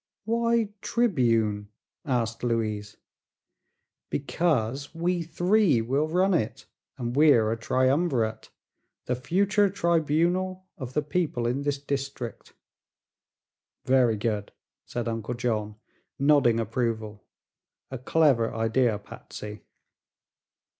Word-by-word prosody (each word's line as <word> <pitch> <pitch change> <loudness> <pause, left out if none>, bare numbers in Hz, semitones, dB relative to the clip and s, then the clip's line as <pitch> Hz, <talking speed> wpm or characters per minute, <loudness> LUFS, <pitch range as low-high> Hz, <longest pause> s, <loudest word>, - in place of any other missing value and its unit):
"Why 230 -1 +1
'Tribune?'" 115 - +1 0.4
asked 120 -5 -1
Louise. 110 -3 -2 1.1
"Because 140 -2 -1
we 175 +1 0
three 175 - +2
will 135 +7 0
run 185 +4 +2
it, 150 -11 -1 0.3
and 120 0 -3
we're 135 -8 +5
a - - 0
triumvirate 130 +1 0 0.6
the 125 - 0
future 200 +9 +2
tribunal 175 +1 0
of 130 -2 -7
the 150 - 0
people 150 -5 -1
in 125 +4 0
this 145 0 -1
district." 140 -4 -5 1.3
"Very 125 -4 +3
good!" 105 -1 -2 0.4
said 120 -1 -3
Uncle 115 +1 -3
John, 110 -3 -2 0.4
nodding 140 -5 +4
approval. 110 -2 -2 0.7
"A 130 - -5
clever 130 -5 +2
idea, 115 0 +1
Patsy." 105 +1 -10
130 Hz, 100 wpm, -26 LUFS, 115-165 Hz, 1.3 s, we're